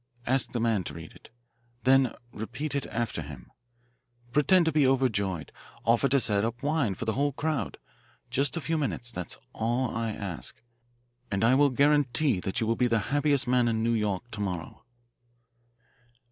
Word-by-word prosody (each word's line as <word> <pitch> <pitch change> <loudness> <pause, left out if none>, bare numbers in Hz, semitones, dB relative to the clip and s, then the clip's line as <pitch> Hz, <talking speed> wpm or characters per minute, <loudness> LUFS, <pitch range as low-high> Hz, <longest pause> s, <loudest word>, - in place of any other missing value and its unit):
Ask 130 0 +1
the 120 - -2
man 115 -4 +1
to - - -6
read 80 -1 -9
it. - - -17 0.5
Then 130 -1 +4 0.2
repeat 125 +8 -5
it 140 -2 -2
after 115 -7 -2
him. 70 -5 -10 0.8
Pretend 170 +6 +4
to 160 - +2
be 145 -3 +4
overjoyed. 100 - 0 0.3
Offer 120 +4 +3
to 140 +2 +4
set 105 -5 +1
up 115 +3 -3
wine 145 -9 +1
for 115 - -5
the 110 - 0
whole 140 +3 +1
crowd. 155 +1 -2 0.5
Just 140 +2 0
a - - -2
few 160 +1 -1
minutes, 120 -4 -2
that 90 -6 -5
is - - -11 0.2
all 120 +2 0
I 115 0 -1
ask, 100 -6 -5 0.7
and 100 +2 -1
I 120 +3 +5
will 140 +2 +5
guarantee 140 -3 +3
that 95 +1 -2
you 115 - +1
will 115 +1 +1
be 125 +1 +2
the 115 +2 0
happiest 145 -2 +2
man 125 -1 +3
in 110 -1 0
New 115 0 +2
York 105 -3 0
to 110 - -6
morrow." 90 +2 -4
120 Hz, 180 wpm, -28 LUFS, 110-140 Hz, 0.8 s, I